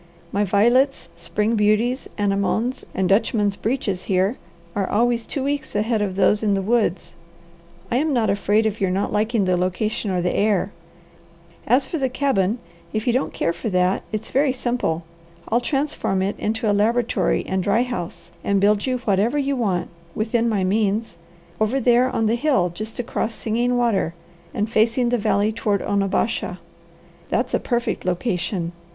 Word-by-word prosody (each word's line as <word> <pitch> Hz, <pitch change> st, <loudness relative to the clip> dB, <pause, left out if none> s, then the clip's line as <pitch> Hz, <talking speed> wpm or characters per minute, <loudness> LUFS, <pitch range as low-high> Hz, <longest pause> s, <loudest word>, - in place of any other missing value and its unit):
My 205 Hz, -, +1 dB
violets, 240 Hz, +8 st, +2 dB
spring 215 Hz, +2 st, -1 dB
beauties, 220 Hz, +5 st, +1 dB
anemones, 205 Hz, +5 st, 0 dB
and 190 Hz, -1 st, +1 dB
dutchman's 205 Hz, 0 st, +2 dB
breeches 205 Hz, -6 st, -2 dB
here 190 Hz, +4 st, +1 dB, 0.4 s
are 195 Hz, -2 st, -1 dB
always 235 Hz, +1 st, +1 dB
two 275 Hz, -, -3 dB
weeks 285 Hz, -3 st, -3 dB
ahead 215 Hz, +1 st, +1 dB
of 195 Hz, -3 st, -1 dB
those 205 Hz, +1 st, +3 dB
in 205 Hz, -2 st, +2 dB
the 195 Hz, -, 0 dB
woods. 215 Hz, -4 st, 0 dB, 0.8 s
I 240 Hz, -, +2 dB
am 305 Hz, +3 st, +1 dB
not 240 Hz, -5 st, +2 dB
afraid 205 Hz, +2 st, +2 dB
of 215 Hz, -1 st, -2 dB
your 190 Hz, -, +2 dB
not 195 Hz, +3 st, -1 dB
liking 215 Hz, 0 st, +1 dB
the 185 Hz, -1 st, +2 dB
location 185 Hz, +4 st, -1 dB
or 185 Hz, -1 st, 0 dB
the 175 Hz, 0 st, 0 dB
air. 205 Hz, -1 st, +1 dB, 1.0 s
As 255 Hz, +4 st, +4 dB
for 330 Hz, -, -4 dB
the 265 Hz, -1 st, +1 dB
cabin, 245 Hz, -6 st, +1 dB, 0.3 s
if 215 Hz, 0 st, -2 dB
you 240 Hz, -, +2 dB
don't 255 Hz, -, 0 dB
care 170 Hz, -, -1 dB
for 220 Hz, -, -4 dB
that, 185 Hz, 0 st, +2 dB
it's 215 Hz, 0 st, -4 dB
very 275 Hz, +1 st, +3 dB
simple. 240 Hz, -10 st, -1 dB, 0.5 s
I'll 235 Hz, +2 st, +2 dB
transform 270 Hz, -9 st, -1 dB
it 200 Hz, +2 st, -1 dB
into 225 Hz, +2 st, -1 dB
a 205 Hz, -, +3 dB
laboratory 230 Hz, +3 st, +1 dB
and 190 Hz, 0 st, -1 dB
dry 215 Hz, +6 st, +2 dB
house, 185 Hz, -9 st, -6 dB
and 200 Hz, -1 st, +2 dB
build 205 Hz, +3 st, +2 dB
you 255 Hz, -1 st, +1 dB
whatever 210 Hz, +7 st, +2 dB
you 280 Hz, -1 st, 0 dB
want, 200 Hz, -8 st, -1 dB, 0.3 s
within 230 Hz, +2 st, +1 dB
my 205 Hz, -4 st, 0 dB
means, 205 Hz, +1 st, 0 dB, 0.4 s
over 220 Hz, +5 st, +1 dB
there 250 Hz, 0 st, +4 dB
on 225 Hz, -, 0 dB
the 220 Hz, -, +2 dB
hill 235 Hz, -, +2 dB
just 215 Hz, +5 st, -7 dB
across 230 Hz, -1 st, -2 dB
Singing 240 Hz, +3 st, 0 dB
Water 220 Hz, -8 st, +1 dB, 0.4 s
and 210 Hz, -, -1 dB
facing 230 Hz, +2 st, +2 dB
the 245 Hz, 0 st, +1 dB
valley 205 Hz, +1 st, +2 dB
toward 210 Hz, -2 st, 0 dB
Onabasha. 200 Hz, -1 st, 0 dB, 0.7 s
That's -, -, 0 dB
a -, -, +3 dB
perfect 240 Hz, -2 st, -1 dB
location. 180 Hz, -2 st, -1 dB
215 Hz, 170 wpm, -22 LUFS, 195-240 Hz, 1.0 s, As